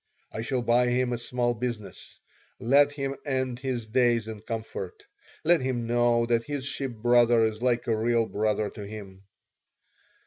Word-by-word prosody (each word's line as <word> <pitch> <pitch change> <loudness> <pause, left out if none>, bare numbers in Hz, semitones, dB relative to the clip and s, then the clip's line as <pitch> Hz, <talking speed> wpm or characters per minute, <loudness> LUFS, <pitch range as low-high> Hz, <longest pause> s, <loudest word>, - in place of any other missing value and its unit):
"I 110 - -4
shall 125 +2 -1
buy 120 +1 +3
him 125 0 +1
a 120 - -3
small 120 0 -1
business. 120 -3 -6 0.4
Let 140 +4 +4
him 135 -1 -3
end 130 -3 -2
his 130 -3 -3
days 120 -1 +2
in 110 -2 -7
comfort. 115 - -6 0.4
Let 170 -1 +4
him 130 -2 -2
know 120 0 +2
that 115 -1 +1
his 145 -2 -4
ship 135 -3 -2
brother 120 0 +4
is 110 0 -1
like 125 -1 +1
a 115 - +1
real 115 +1 +2
brother 105 -1 -1
to 105 - -8
him." 100 -2 -10
120 Hz, 165 wpm, -27 LUFS, 110-130 Hz, 0.4 s, Let